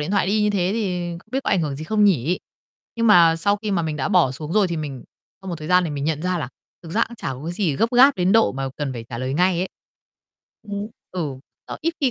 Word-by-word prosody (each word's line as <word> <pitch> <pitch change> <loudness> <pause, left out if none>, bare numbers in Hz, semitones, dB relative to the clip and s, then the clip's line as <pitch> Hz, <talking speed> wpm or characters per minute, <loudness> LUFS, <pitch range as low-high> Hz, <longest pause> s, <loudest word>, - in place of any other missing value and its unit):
điện 150 - -3
thoại 200 -3 +2
đi 210 +2 +2
như 210 - +2
thế 185 -3 0
thì 180 -6 -2
không 195 - -21
biết 265 +2 -1
có - - 0
ảnh 185 - +3
hưởng 145 -4 -2
gì 155 - -6
không 210 +4 +2
nhỉ? 180 -3 +2 0.6
Nhưng 230 0 +1
mà 170 -6 +6
sau 200 +5 +2
khi 215 - -2
mà 185 -4 +1
mình 155 -2 -3
đã 135 - -1
bỏ 130 - +4
xuống 150 +4 -6
rồi 210 -1 +4
thì 170 - -3
mình 145 -5 -5 0.4
sau 190 - -8
một 175 - -3
thời 155 0 -8
gian 180 0 +4
thì 165 - -3
mình 145 -1 -3
nhận 155 0 -1
ra 180 -1 0
là 140 - -4 0.3
thực 165 - -10
ra 230 - +3
cũng 235 - -10
chả 165 -10 -4
có 130 - -10
cái 170 - -3
gì 175 -6 0
gấp 225 +8 +1
gáp 270 +3 +7
đến 180 +1 +2
độ 225 0 +4
mà 135 0 -3
cần 145 -3 -3
phải 115 -2 -7
trả 120 - -6
lời 130 +2 -2
ngay 180 +2 +2
ấy. 185 +2 -1 0.9
Ừm, 205 -1 -5 0.2
ừ, 185 - -4 0.5
đó, - - -6
ít 330 +2 -1
khi 270 -3 +3
175 Hz, 290 wpm, -22 LUFS, 150-205 Hz, 0.9 s, gáp